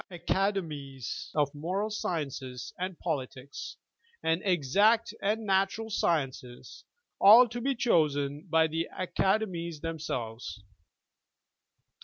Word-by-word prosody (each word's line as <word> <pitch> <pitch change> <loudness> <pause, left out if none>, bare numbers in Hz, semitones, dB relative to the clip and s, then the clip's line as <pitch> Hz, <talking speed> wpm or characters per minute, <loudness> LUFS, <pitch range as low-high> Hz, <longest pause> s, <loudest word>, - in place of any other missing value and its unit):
Academies 165 - -2
of 145 -2 +1
Moral 185 +8 -2
Sciences 140 - -4
and 185 -1 -3
Politics, 140 -4 -5 0.5
and 165 +2 +1
Exact 200 - +3
and 215 +2 0
Natural 195 +3 +1
Sciences 135 - -2 0.2
— - - -55
all 225 +5 +9
to 240 +1 -5
be 270 +2 0
chosen 150 - +1
by 160 0 +4
the 160 +1 -2
Acade 190 +3 +1
mies 170 -4 -6
themselves. 125 -10 -4
165 Hz, 105 wpm, -29 LUFS, 145-200 Hz, 0.5 s, all